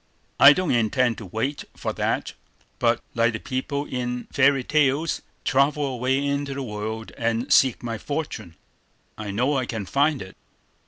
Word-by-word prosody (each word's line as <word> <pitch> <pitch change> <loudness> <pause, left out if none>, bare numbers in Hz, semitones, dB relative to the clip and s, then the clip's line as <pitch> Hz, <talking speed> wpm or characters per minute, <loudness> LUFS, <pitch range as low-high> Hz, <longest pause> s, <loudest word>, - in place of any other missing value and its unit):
I 140 +1 +10
don't 185 +1 -1
intend 120 +1 +1
to 105 - -8
wait 125 +10 -2
for - - -3
that, - - -1 0.5
but, - - +2
like 115 0 +2
the 110 - -4
people 140 +3 -3
in 125 -2 -3
fairy 135 -1 +4
tales, 150 +2 +1 0.2
travel 145 +1 +2
away 130 +1 0
into 140 -1 -2
the 140 - -3
world 110 0 -5
and 115 +1 0
seek 130 -3 +4
my 115 -2 -4
fortune. 145 - -5 0.6
I 110 -1 -6
know 125 +8 +1
I 130 -2 -1
can 110 -4 -4
find 140 +6 +2
it." 95 - -13
130 Hz, 160 wpm, -24 LUFS, 115-140 Hz, 0.6 s, I